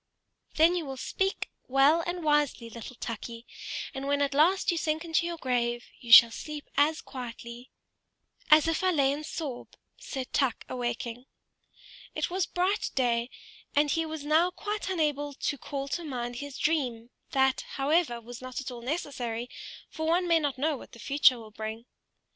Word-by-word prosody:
"Then 330 +3 +5
you 350 - -1
will 270 -1 -5
speak 385 +8 -2 0.2
well 275 +5 +5
and 350 0 -3
wisely, 295 -6 +1
little 235 +2 -8
Tukey; 230 0 -6 0.5
and 270 0 -4
when 285 0 +2
at 280 -1 -1
last 350 +7 +4
you 340 - -1
sink 315 +1 -1
into 335 +1 +1
your 340 -1 -4
grave, 240 -3 -1
you 235 - -7
shall 230 0 +11
sleep 300 +4 -7
as 300 +3 +3
quietly 240 -1 -8 0.4
" - - -52
"As 305 +1 +7
if 330 +2 0
I 370 - +4
lay 280 -6 +3
in 290 +2 -3
Soroe," 295 -5 -5 0.3
said 265 -3 -6
Tuk, 265 -5 +1
awaking. 240 0 -4 0.9
It - - -1
was 370 0 0
bright 375 +4 0
day, 240 -2 +1 0.5
and 290 0 +4
he 330 - +1
was 310 -2 -6
now 320 +4 +4
quite 415 +2 -4
unable 295 -5 0
to 285 - -2
call 275 -1 -4
to 345 - -2
mind 245 -5 -4
his 285 0 -6
dream; 250 -7 -1 0.2
that, 265 -1 +3
however, 280 -3 +1
was 235 +1 -10
not 255 -1 -5
at 275 -1 -5
all 240 -1 -8
necessary, 245 -4 -3 0.4
for 315 0 -4
one 350 +2 +2
may 335 -1 +5
not 285 -4 -1
know 300 +2 0
what - - -13
the - - -11
future 275 +1 +4
will 220 -2 -11
bring. 220 +2 -6
280 Hz, 175 wpm, -29 LUFS, 245-315 Hz, 0.9 s, shall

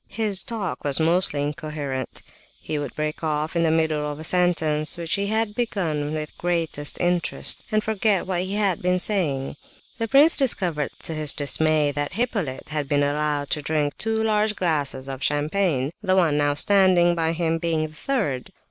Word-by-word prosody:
His 205 -5 +1
talk 215 -6 -4
was 145 0 0
almost 170 +3 +2
incoherent; 145 -2 -4 0.4
he 150 - -3
would 145 -3 -5
break 155 +1 -3
off 155 +1 -1
in 170 - +2
the 165 - +3
middle 155 -2 0
of 145 - -8
a - - -7
sentence 160 -3 +1
which 170 -1 -3
he 200 0 0
had 220 0 0
begun 165 -11 -2
with 155 -1 -5
great 170 -2 -1 0.2
interest, 175 -2 0
and 215 0 +1
forget 215 -2 +1
what 185 -2 -1
he 190 +2 -3
had 200 -5 0
been 180 0 +1
saying. 155 -9 0 0.4
The 225 - -1
prince 290 +8 +6
discovered 180 - 0
to 165 - -3
his 155 -2 +2
dismay 150 0 +2
that 145 0 -3
Hippolyte 200 - -2
had 150 -2 -3
been 145 -1 +2
allowed 145 0 -1
to 150 - 0
drink 150 -1 -1
two 220 0 -1
large 215 -1 +1
glasses 145 -7 -1
of 135 -1 -6
champagne; 145 -1 0
the 190 -3 +1
one 170 -6 +3
now 145 -1 +1
standing 185 0 +4
by 165 -1 0
him 165 -1 0
being 165 -2 0
the 155 - -15
third. 155 - -2
160 Hz, 180 wpm, -23 LUFS, 150-190 Hz, 0.4 s, prince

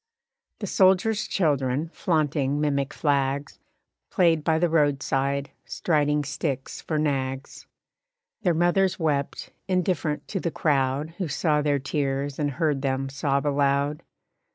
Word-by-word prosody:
The - - -2
soldier's 195 +3 +3
children, 145 -3 0
flaunting 145 -4 0
mimic 140 -2 0
flags, 140 -1 -1 0.5
Played 165 -4 +3
by 160 0 +2
the 175 +2 +2
roadside, 140 -3 +1
striding 150 -2 0
sticks 135 -1 -4
for 155 - -2
nags. 135 -3 -2 0.7
Their 175 -5 +2
mothers 175 +3 +2
wept, 145 -4 -2 0.2
indifferent 180 -5 -1
to 195 - -2
the 170 - -1
crowd 140 -1 0
Who 185 - -1
saw 150 +1 +1
their 145 -1 +1
tears 140 0 -2
and 145 -1 +1
heard 145 0 0
them 135 0 -1
sob 140 +1 -1
aloud. 140 +1 +1
145 Hz, 125 wpm, -25 LUFS, 140-160 Hz, 0.7 s, soldier's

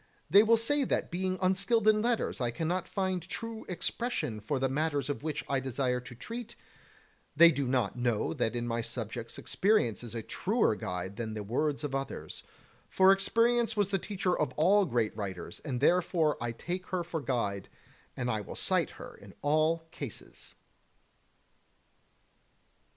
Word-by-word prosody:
They 200 +4 +9
will 225 +1 +5
say 280 +6 +2
that - - -1
being 185 +1 -1
unskilled 200 +4 +2
in 215 0 +5
letters 235 - 0
I 120 - +1
cannot 165 +9 -2
find 185 -2 -1
true 225 +6 -6
expression 180 - -2
for 110 +7 -2
the 135 +1 +1
matters 145 0 -1
of - - -5
which 155 -1 -3
I 135 - +1
desire 130 -1 -1
to 125 0 -11
treat; 230 - -7 0.8
they 170 +2 +8
do 140 -3 -1
not 125 -1 0
know 120 -3 0
that 115 - -1
in 120 0 -2
my 115 0 -1
subjects 115 0 -5
experience 195 - +1
is 120 -1 -8
a 115 - -3
truer 210 - +1
guide 90 +1 -5
than 110 -2 -4
the 105 - -4
words 140 +7 -1
of 145 -2 -3
others, 135 0 -4 0.5
for 190 0 +6
experience 230 +3 +2
was 205 -2 +2
the 195 -1 +1
teacher 185 -2 -1
of 150 - -1
all 190 +5 +4
great 115 -6 0
writers, 95 -5 -5
and 130 -5 -4
therefore 165 0 +3
I 120 0 -1
take 180 +8 -5
her 180 -2 -1
for 165 -2 -4
guide, 105 -8 -2 0.5
and 125 - -2
I 110 -2 -1
will 100 - -8
cite - - +1
her - - -9
in - - -15
all 155 +3 +2
cases. 135 -9 -9
150 Hz, 165 wpm, -30 LUFS, 120-190 Hz, 0.8 s, They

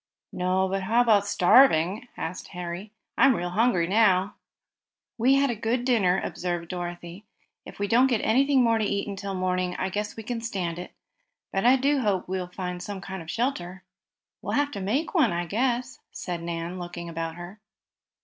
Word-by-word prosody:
"No, 185 +1 +1
but 195 +1 -2
how 225 +5 +1
about 210 -4 +3
starving?" 205 0 +4
asked 170 +3 -5
Harry. 180 +3 -6 0.3
"I'm 265 - +6
real 175 -1 -3
hungry 215 -3 +2
now." 195 0 +3 0.9
"We 260 +4 +4
had 275 -1 +3
a - - -3
good 230 +3 -1
dinner," 195 -8 +3
observed 175 -2 -3
Dorothy. 175 +1 -6 0.4
"If - - -11
we 205 - -1
don't 245 +5 +5
get 245 -3 +2
anything 265 +3 +3
more 230 -1 +3
to - - 0
eat 200 0 -1
until 200 -1 -5
morning 185 -1 -1
I 190 - -2
guess 210 +2 -3
we 225 - -7
can 235 +1 -4
stand 180 -7 -3
it. 180 - -8 0.6
But 195 +3 0
I 255 - +7
do 275 +2 +2
hope 205 -7 0
we 190 +1 -2
can 180 -1 -5
find 180 -1 -5
some 195 +1 -6
sort 190 -2 -6
of 165 - -11
shelter." 190 -6 -2 0.6
"We'll - - -4
have 290 0 +1
to 200 - -5
make 265 - -1
one, 305 - +3
I 175 0 -2
guess," 245 +6 -1
said 175 -2 -5
Nan, 170 +1 -4
looking 175 -1 -7
about 165 -1 -4
her. 175 +4 -10
195 Hz, 190 wpm, -26 LUFS, 180-235 Hz, 0.9 s, I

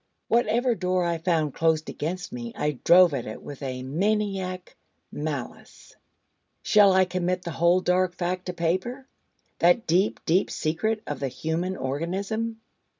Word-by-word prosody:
Whatever 240 +2 +2
door 185 -2 0
I 170 -1 -1
found 160 -4 0
closed 160 -1 +1
against 180 +7 -4
me 240 -1 -6
I 150 -4 -2
drove 175 -1 +7
at 130 -4 -3
it 110 - -8
with 145 -1 -9
a 130 -2 -4
maniac 190 +3 -2 0.4
malice. 145 -4 -6 0.7
Shall 205 -2 +6
I 190 0 +5
commit 180 0 -2
the 170 - -4
whole 170 +3 +3
dark 180 0 +1
fact 180 +1 -3
to 180 - -3
paper? 185 +11 -2 0.5
that 175 +7 +4
deep, 180 +5 +2
deep 175 +4 +2
secret 215 +8 -1
of 145 - -4
the 140 - -1
human 165 +7 -3
organism? 195 +11 -3
180 Hz, 150 wpm, -26 LUFS, 160-195 Hz, 0.7 s, drove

